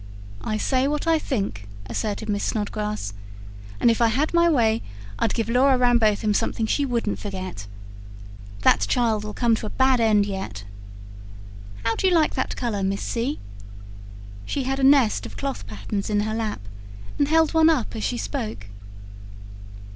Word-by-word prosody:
"I 215 - -1
say 260 +4 +1
what 295 +2 -1
I 325 -1 +3
think," 195 - -3 0.2
asserted 215 - -3
Miss 205 -1 -1
Snodgrass. 210 - -2 0.7
"And 235 - +5
if 230 - -1
I 230 - +6
had 275 +9 0
my 340 0 +4
way, 230 -7 +2 0.4
I'd 225 - 0
give 225 -2 -1
Laura 260 +3 +4
Rambotham 225 -4 +3
something 220 +2 0
she 280 +5 0
wouldn't 235 -4 -1
forget. 185 - -6 1.0
That - - +5
child'll 220 -4 0
come 235 -2 +2
to 215 - -5
a - - -4
bad 260 +1 +3
end 215 -3 +4
yet. 190 - -5 1.2
How 225 - +1
do 380 - +1
you 365 - +3
like 315 -2 +3
that 260 - -2
colour, 230 -5 -2
Miss 195 +1 -1
C.?" 245 +5 -2 1.1
She 275 - -2
had 270 +1 -2
a - - -1
nest 270 -5 +4
of - - -11
cloth 275 - -4
patterns 105 - -4
in 205 -1 +2
her 215 +1 -2
lap, 220 - -3 0.6
and 285 - +3
held 320 +1 +3
one 320 0 +5
up 285 - 0
as 110 - -4
she 105 +4 -1
spoke. 100 0 -5
225 Hz, 165 wpm, -24 LUFS, 205-265 Hz, 1.2 s, I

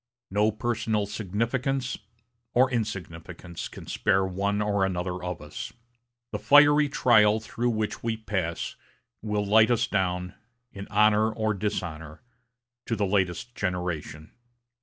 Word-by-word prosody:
No 105 +2 +3
personal 110 -2 -1
significance, 115 +6 -2 0.6
or 130 +2 +4
insignificance, 90 -6 -5
can - - -11
spare 95 -1 +1
one 100 +2 -1
or 105 -2 +1
another 90 -1 -2
of 90 -4 -4
us. 75 - -7 0.6
The - - -3
fiery 145 0 +6
trial 110 -5 +4
through 120 +2 -2
which 110 -2 -2
we 115 -1 -2
pass 95 -6 -3 0.5
will 105 -1 -1
light 110 +2 +5
us 120 -1 +2
down, 90 -4 -1 0.4
in 100 0 -8
honor 105 +1 +4
or 110 0 -1
dishonor, 85 -6 -4 0.6
to 115 - 0
the 105 -2 0
latest 95 +3 -1
generation. 90 -6 -4
105 Hz, 125 wpm, -27 LUFS, 90-110 Hz, 0.6 s, fiery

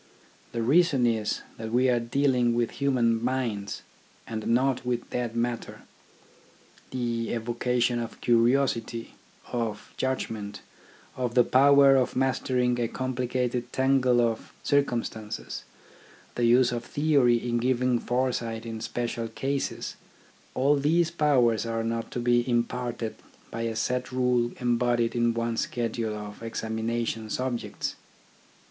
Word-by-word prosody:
The 115 -1 -2
reason 140 0 +4
is 110 -3 0
that 110 0 -6
we 125 +2 +3
are 125 -1 +3
dealing 125 0 +2
with 120 -1 0
human 120 -5 +2
minds, 120 -6 -2 0.4
and 110 -1 -5
not 130 +2 +2
with 125 -1 -2
dead 120 -2 -2
matter. 120 0 -3 1.1
The 120 -2 -2
evocation 120 +1 0
of 115 -1 -6
curiosity, 115 -1 +1 0.4
of 115 -3 -3
judgment, 110 -6 -3 0.5
of 125 -2 -2
the 125 - +7
power 140 +1 +6
of 130 - 0
mastering 125 -1 +1
a 120 - +1
complicated 125 -1 -2
tangle 130 -2 +3
of 115 -2 -1
circumstances, 120 -6 -1 0.7
the 120 - 0
use 120 +1 +5
of 120 -1 -3
theory 140 -5 +3
in 120 0 -1
giving 125 0 +1
fore 125 +2 0
sight 115 -1 -4
in 115 -1 -5
special 120 0 -3
cases 135 +5 -3 0.3
— - - -30
all 140 +3 +3
these 165 +4 +2
powers 130 -9 +3
are 115 0 -1
not 115 0 -2
to - - -4
be 120 0 +3
imparted 120 -1 -1 0.3
by 115 - -4
a 115 -1 -2
set 125 +3 -1
rule 125 -2 +1
embodied 120 -1 +1
in 120 -1 +2
one 115 0 -1
schedule 115 -2 -2
of 105 0 -8
examination 115 0 -3
subjects. 125 0 -3
120 Hz, 130 wpm, -27 LUFS, 115-130 Hz, 1.1 s, the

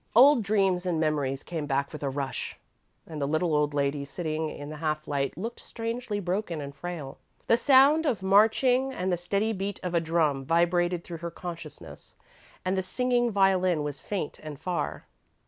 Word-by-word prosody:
Old 265 +2 +8
dreams 195 -3 +1
and 170 -3 0
memories 145 -4 0
came 160 -4 -4
back 140 +1 -1
with 155 - -7
a 140 - -1
rush, 135 0 -4 0.5
and 155 -2 -7
the 140 - 0
little 155 +2 +1
old 150 0 +1
lady 140 0 0
sitting 155 +1 -3
in 145 0 -7
the 155 - -7
half 155 0 -2
light 140 0 -1
looked 230 +6 -5
strangely 230 -2 -4
broken 180 -2 -2
and 140 -1 -6
frail. 160 -4 -6 0.3
The - - +5
sound 280 +5 +5
of 215 -9 0
marching 235 +7 +4
and 185 -6 -1
the - - +4
steady 200 +6 -1
beat 195 0 -4
of 180 -1 -3
a 170 - +4
drum 160 -4 +1
vibrated 175 +3 +2
through 170 - -7
her 170 +1 -5
consciousness 165 - -9 0.5
and 185 +1 +1
the 190 - +1
singing 245 +5 +1
violin 185 -5 +3
was 145 -2 -4
faint 195 -8 -4
and 150 -2 -8
far. 180 +1 -3
175 Hz, 180 wpm, -28 LUFS, 150-200 Hz, 0.5 s, Old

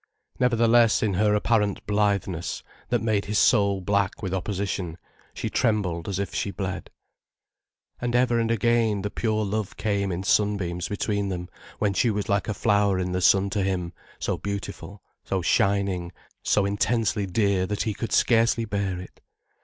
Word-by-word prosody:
Nevertheless 115 -2 +4
in 105 -3 +1
her 105 +3 +2
apparent 105 -2 +1
blitheness, 100 -5 -1 0.3
that 120 -3 0
made 110 -3 +1
his 105 +1 -1
soul 100 -5 +3
black 100 +2 0
with 95 -1 -2
opposition, 95 -3 -3 0.3
she - - -4
trembled 95 -6 0
as 95 - -2
if 100 -2 -3
she - - -1
bled. 95 -2 -5 1.1
And 120 0 -1
ever 120 -1 +3
and 115 -1 0
again, 115 -2 +1
the 105 - -3
pure 110 -2 -1
love 105 0 -3
came 100 -2 -1
in 90 +2 -3
sunbeams 95 -4 0
between 100 -1 -1
them, 90 -1 -5 0.3
when 105 -2 +1
she 115 +6 +2
was 105 -2 -2
like 100 0 0
a 110 - -2
flower 100 -2 +2
in 90 0 -2
the 90 0 -1
sun 95 +2 +4
to 100 - 0
him, 90 -2 -2 0.2
so - - -2
beautiful, 100 0 -6 0.2
so 95 -2 -2
shining, 95 -2 +1 0.3
so 100 - +2
intensely 100 0 0
dear 95 -1 +1
that 105 +1 -1
he 110 - -1
could 115 - -5
scarcely 115 0 +3
bear 100 -3 -2
it. 90 - -12
100 Hz, 165 wpm, -25 LUFS, 95-110 Hz, 1.1 s, Nevertheless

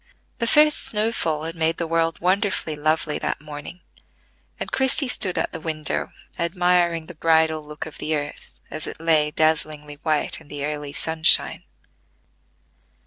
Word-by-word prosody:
The 235 - 0
first 300 +4 +5
snow 215 +1 -1
fall 155 -8 -1
had 165 +1 -4
made 165 0 +1
the 170 - -2
world 165 0 0
wonderfully 185 -3 +1
lovely 155 +1 0
that - - -2
morning; 150 +4 -9 0.8
and - - -5
Christie 265 +1 +2
stood 190 -7 +1
at - - 0
the 165 - -6
window 155 -1 -2 0.3
admiring 175 -1 +1
the 175 - -10
bridal 160 -1 +2
look 150 0 -7
of 160 - -10
the 155 +1 -1
earth, 145 -1 -6
as 155 - -4
it - - -7
lay 160 -2 +3
dazzlingly 150 -1 -1
white 155 -3 0
in - - -17
the 145 -1 -4
early 150 -1 -4
sunshine. 160 +1 +3
160 Hz, 155 wpm, -23 LUFS, 150-175 Hz, 0.8 s, first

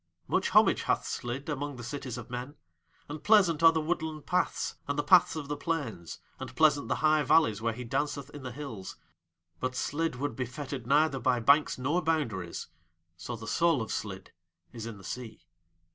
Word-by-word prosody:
Much - - +1
homage - - +5
hath - - 0
Slid 125 +3 -4
among 145 -1 -3
the 120 - -8
cities 130 -1 -5
of 120 0 -9
men 125 +4 -5 0.5
and 150 +1 -7
pleasant 180 -6 +5
are 165 0 +8
the 160 - 0
woodland 155 -2 -3
paths 180 0 0
and 145 0 -2
the 145 - +1
paths 180 -3 +5
of 150 -3 -5
the 145 - -2
plains, 115 - -4 0.2
and 130 -1 -7
pleasant 150 -1 +4
the - - 0
high 155 0 +5
valleys 145 -9 +3
where 115 0 +1
he 125 - -6
danceth 140 +3 -2
in 145 - -9
the 125 -1 -6
hills; 120 -8 -7 0.6
but 130 0 -2
Slid 160 +3 -1
would 140 -1 -3
be 125 -1 -3
fettered 130 -1 -6
neither 145 0 +3
by 125 0 +2
banks 140 +6 +4
nor 145 +8 0
boundaries 120 - -2 0.5
so 120 +8 -6
the 115 0 -9
soul 165 +6 +2
of 110 - -4
Slid 100 -3 -5 0.4
is 115 -1 -6
in 115 -3 -7
the 95 - -14
Sea. 110 -4 -7
140 Hz, 190 wpm, -30 LUFS, 120-155 Hz, 0.6 s, are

